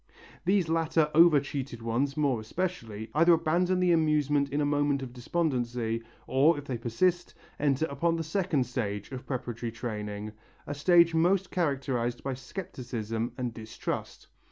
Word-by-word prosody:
These 190 -1 +3
latter 160 -1 +1
over 165 -2 +7
cheated 135 -4 -5
ones, 130 +5 -1
more 140 -6 +2
especially, 110 - -4
either 165 +4 +5
abandon 170 +3 +2
the 180 -1 +3
amusement 150 -3 +2
in 145 +2 -1
a 145 - +2
moment 145 -1 +1
of 125 -2 -8
despondency 120 -5 -1 0.2
or, 145 +5 +4
if 145 - -7
they 125 -4 -4
persist, 175 +10 0 0.2
enter 145 +1 +2
upon 165 +4 0
the 165 - -2
second 160 -4 0
stage 105 -4 -4
of 130 -1 -7
preparatory 120 -3 -4
training, 105 -2 -5 0.3
a - - -4
stage 170 +3 +5
mostly 180 +3 +2
characterized 130 -7 -1
by 135 - -2
scepticism 125 - -5
and 125 -2 -3
distrust. 110 -1 -5
140 Hz, 150 wpm, -29 LUFS, 120-165 Hz, 0.3 s, over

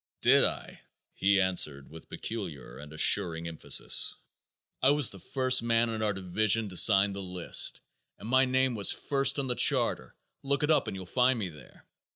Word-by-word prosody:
"Did - - +4
I?" - - -6 0.3
he 100 +1 +1
answered 75 -8 -2
with 80 0 -14
peculiar 75 - -7
and 75 0 -12
assuring 80 +1 +2
emphasis. 80 -2 +2 0.7
"I 130 - +3
was 145 -3 +2
the 95 - -9
first 130 +4 +1
man 115 0 0
on 110 -1 -5
our 105 -1 0
division 105 +3 -1
to 90 - -10
sign 100 +3 +4
the 100 0 -7
list, 90 -2 -1 0.4
and - - -11
my 130 +2 +3
name 130 0 0
was 105 -3 +3
first 140 0 0
on 140 - -2
the 125 - -1
charter. 65 - 0 0.3
Look 140 +1 -2
it 150 - +1
up 155 - +1
and 95 - -6
you'll 95 - -9
find 125 +6 +1
me 100 -5 -4
there. 75 -3 -17
105 Hz, 185 wpm, -28 LUFS, 90-130 Hz, 0.7 s, Did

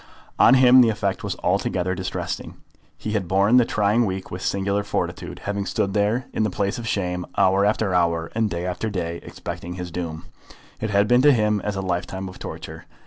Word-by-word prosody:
On 135 - +7
him 130 0 +7
the 120 - +5
effect 100 -3 -2
was - - -2
altogether 90 0 0
distressing. - - -4 0.4
He 105 - -5
had 100 -4 -1
borne 100 +6 +4
the 125 - +5
trying 105 +3 +2
week 95 0 -5
with 90 - -5
singular 100 +1 0
fortitude, - - -4
having 100 -1 -2
stood 100 +2 -1
there 105 +5 +1
in - - -1
the 110 - +2
place 100 +3 -2
of 115 - -6
shame 90 -4 -1
hour 95 +2 +4
after 105 -2 0
hour, 85 -2 +1
and 110 -1 +1
day 85 0 -3
after 90 +5 -2
day, 85 -4 -3
expecting 90 +1 -7
his 90 -1 -6
doom. 80 -2 -5 0.5
It 110 - -2
had 100 0 +3
been 125 +2 +5
to 145 +2 +7
him 105 -4 +2
as 105 -1 -2
a 95 - -2
lifetime 95 +1 -3
of 95 - -12
torture. - - -8
100 Hz, 200 wpm, -23 LUFS, 90-110 Hz, 0.5 s, On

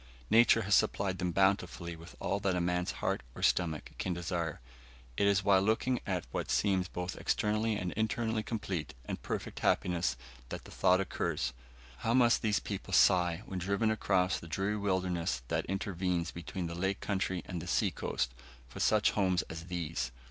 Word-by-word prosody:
Nature 115 0 +6
has 100 0 0
supplied 95 -2 +2
them 90 -1 0
bountifully 95 -2 +1
with 85 +2 -12
all 100 - -1
that 95 -2 +1
a - - +1
man's 90 0 0
heart - - +1
or - - -6
stomach 80 -4 +1
can 90 -2 -1
desire. 85 -2 -2 0.6
It 100 - +2
is 100 -1 +3
while 95 -1 +5
looking 115 +5 +1
at 90 -6 -1
what - - -3
seems 95 -3 +2
both 90 0 -4
externally 110 +1 +1
and 90 -3 -2
internally 110 +1 0
complete 95 - -4
and - - -5
perfect - - -4
happiness 85 -8 +1 0.3
that - - -6
the - - -12
thought 90 +1 +3
occurs 70 -8 -1 0.4
how 115 - 0
must 120 -2 +5
these 105 -1 +2
people 100 -2 -3
sigh, 90 +1 +4
when 95 - -4
driven 100 +5 +1
across 90 -4 +1
the 85 - -10
dreary 95 +6 -1
wilderness 90 -8 -1
that - - 0
intervenes 90 -3 -1
between 85 +1 -5
the 85 - -4
lake 95 +3 -1
country 95 -3 -1
and 90 -3 -5
the 90 - -8
sea - - +2
coast, 60 0 -2 0.3
for - - -10
such 105 -1 +4
homes 95 -3 +2
as 80 +1 -7
these! 80 -8 -3
95 Hz, 175 wpm, -32 LUFS, 85-100 Hz, 0.6 s, Nature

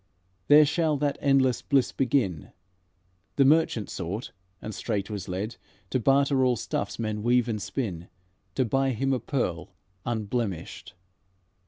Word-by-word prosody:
There 150 +1 +8
shall 155 0 +1
that 145 0 -1
endless 135 -4 +3
bliss 135 -3 +2
begin, 120 - -1 0.8
The 135 - +4
merchant 145 -8 +3
sought, 95 +7 -5 0.3
and 110 - -6
straight 105 -1 -3
was 100 -2 -5
led 100 +5 -4 0.3
To 130 - +1
barter 135 +2 +3
all 125 -1 +3
stuffs 110 - -3
men 110 -2 -3
weave 120 +1 +2
and 110 -3 -2
spin, 95 -9 -4 0.5
To 130 - +2
buy 135 +3 +1
him 135 +4 0
a 130 - 0
pearl 105 - -3 0.3
unblemished." 110 -7 -3
120 Hz, 140 wpm, -27 LUFS, 105-135 Hz, 0.8 s, There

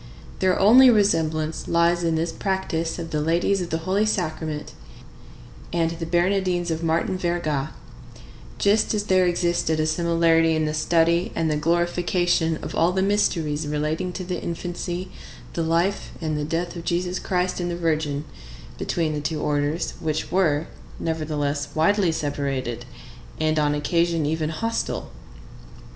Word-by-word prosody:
Their 185 -1 +2
only 250 +6 +8
resemblance 160 -8 +1
lies 170 +1 +2
in 165 -1 +1
this 165 +1 -1
practice 185 -4 -2
of 165 -1 -6
the 150 - 0
Ladies 170 +5 +1
of 175 - -4
the 160 - 0
Holy 200 +3 +2
Sacrament 155 -6 -2 1.0
and 165 -1 +1
the 165 0 -5
Bernardines 175 0 +1
of 160 0 -2
Martin 165 +3 0
Verga, 155 -5 -1 0.9
just 210 +2 +2
as 205 - 0
there 185 -2 +3
existed 175 -2 +1
a 155 - +2
similarity 165 0 +3
in 155 0 +1
the 155 - -1
study 170 +5 +2
and 160 -1 0
the - - +1
glorification 175 +1 +1
of - - -5
all 170 +2 +3
the 190 +1 0
mysteries 165 -7 +1
relating 150 +4 -1
to 185 - -5
the 180 0 -4
infancy, 175 +1 -4 0.4
the 170 - -2
life, 170 +4 0
and 155 -2 -2
death 170 +2 -2
of 170 - -6
Jesus 180 +1 -1
Christ 180 0 -1
and 175 0 -2
the 170 - -3
Virgin, 155 -3 -1 0.5
between 160 -3 -1
the 150 - -3
two 155 +1 -2
orders, 145 +2 -1
which 155 -2 -2
were, 160 -5 +2 0.3
nevertheless, 150 -3 -2
widely 180 +3 +3
separated, 140 -6 -3 0.5
and 155 0 +1
on 145 -1 +2
occasion 165 +2 +1
even 155 +1 -1
hostile. 225 +8 -3
165 Hz, 150 wpm, -24 LUFS, 155-180 Hz, 1.0 s, only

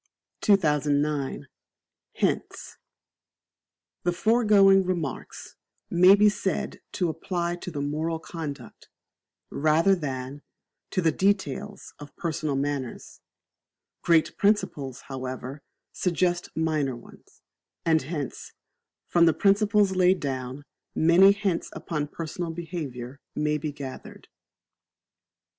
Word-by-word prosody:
2009. 150 - +1 0.7
Hints. - - -2 1.2
The 175 - +1
foregoing 200 -1 +5
Remarks 175 -7 -4 0.4
may 180 +3 +7
be 210 +1 +5
said 200 -2 -2
to 180 - 0
apply 170 +1 -2
to 180 - -7
the 145 -4 -4
moral 155 +3 -2
conduct, 150 -7 -8 0.6
rather 155 +6 +3
than, 140 -4 -4 0.5
to 185 - -1
the 165 - +4
details 200 +2 -1
of 145 -1 -11
personal 155 -3 -2
manners. 140 -2 -4 0.8
Great 165 -2 +3
principles, 145 - 0
however, 130 +1 -6 0.3
suggest 175 -1 0
minor 155 -5 0
ones; 120 - -17 0.4
and 160 -1 +3
hence, 145 -2 -6 0.5
from 170 -1 +4
the 160 - +3
principles 200 +1 +3
laid 185 0 +4
down, 130 0 -4 0.3
many 175 +5 +6
hints 200 -4 -1
upon 150 -3 -3
personal 165 +3 -5
behaviour 150 -7 -6 0.2
may 150 0 0
be 150 0 -3
gathered. 140 -2 -9
160 Hz, 100 wpm, -26 LUFS, 145-185 Hz, 1.2 s, may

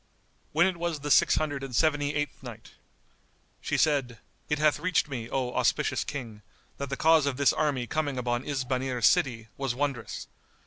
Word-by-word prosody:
When 165 +3 +4
it 190 -2 0
was 170 -3 -3
the 145 0 -3
Six - - +5
Hundred 145 -3 -1
and 130 -3 -5
Seventy 145 0 +2
eighth 145 0 -3
Night, 120 -4 -10 0.9
She - - -1
said, 135 -6 +1 0.3
It 150 - +1
hath 150 0 +2
reached 180 -4 +1
me, 120 -5 -5
O 130 -2 -2
auspicious - - +1
King, 115 -7 -7 0.4
that 140 -1 -4
the 135 - -3
cause 160 -2 +4
of 135 -3 -1
this 140 -2 +4
army 145 -5 0
coming 145 0 -2
upon 120 0 -1
Isbanir 130 -3 -2
city 115 -1 +2
was 135 -3 -2
wondrous. 135 -3 -3
140 Hz, 175 wpm, -28 LUFS, 125-150 Hz, 0.9 s, Six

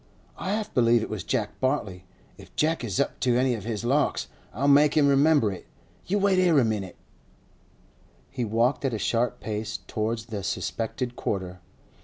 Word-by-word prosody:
'I 190 - -2
half 215 0 -3
believe 120 -2 +4
it - - -6
was 105 -5 -4
Jeck 110 -4 -2
Bartley. 105 -9 -1 0.3
If - - -16
Jeck 160 -2 +1
is 100 -6 -2
up - - -1
to 125 -1 +2
any 130 0 +2
of 110 -4 -5
his 115 -1 -3
larks, 140 +4 +1 0.2
I'll 135 +7 -1
make 145 +2 +5
him 145 -2 +5
remember 140 -5 +4
it. 95 - -9 0.4
You 200 - +1
wait 195 -2 +3
here 175 -4 +4
a 130 - +5
minute!' 100 -5 -3 1.4
He 130 -2 -3
walked 115 +6 +1
at 130 -4 0
a - - -1
sharp 120 +4 0
pace 110 0 -4
towards 110 +1 -2
the 110 -3 -5
suspected 120 +5 -3
quarter. 95 -2 -3
120 Hz, 180 wpm, -26 LUFS, 110-140 Hz, 1.4 s, make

